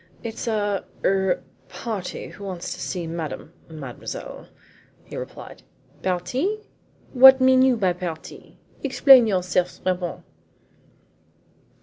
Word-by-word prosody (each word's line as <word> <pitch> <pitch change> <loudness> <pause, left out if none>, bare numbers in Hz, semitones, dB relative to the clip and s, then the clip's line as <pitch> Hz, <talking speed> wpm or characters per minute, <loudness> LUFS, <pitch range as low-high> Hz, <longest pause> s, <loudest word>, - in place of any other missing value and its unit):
"It's 230 0 -5
a 205 -3 0 0.2
er - - +5 0.2
er - - 0 0.3
party 210 -6 -5
who 200 - -12
wants 185 -3 -5
to - - -11
see 180 -3 -4
Madam, 160 -2 -6 0.2
mademoiselle," 140 -6 -8 0.6
he - - -11
replied. - - -8 0.4
"Parti? 250 - -1 0.5
What 265 +1 +9
mean 260 0 +5
you 260 -2 +4
by 190 -4 +1
parti? 175 -3 -8 0.3
Explain 265 -3 +6
yourself, 180 -2 0
Trappon." 180 -2 -2
190 Hz, 110 wpm, -23 LUFS, 175-250 Hz, 0.6 s, What